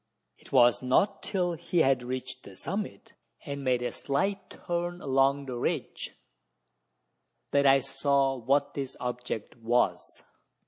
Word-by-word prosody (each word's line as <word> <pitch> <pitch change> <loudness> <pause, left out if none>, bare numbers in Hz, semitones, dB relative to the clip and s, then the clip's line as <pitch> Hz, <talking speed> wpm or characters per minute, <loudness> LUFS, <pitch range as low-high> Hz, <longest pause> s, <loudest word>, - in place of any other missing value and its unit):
It - - -19
was 120 -3 +5
not 130 +11 +2
till 180 -3 -1
he 170 +1 0
had 135 -1 +3
reached 130 +1 -5
the 100 - -13
summit, 195 - -5 0.3
and 140 -1 -5
made 125 -2 +1
a 125 - -1
slight 195 +8 -2
turn 175 0 -3
along 135 -1 +2
the 125 -2 -5
ridge, - - -3 1.4
that 140 0 +4
I 135 0 +6
saw 140 0 +1
what 135 +4 +1
this 135 -2 -5
object 125 -3 -4
was. 120 +1 0
135 Hz, 135 wpm, -29 LUFS, 125-145 Hz, 1.4 s, I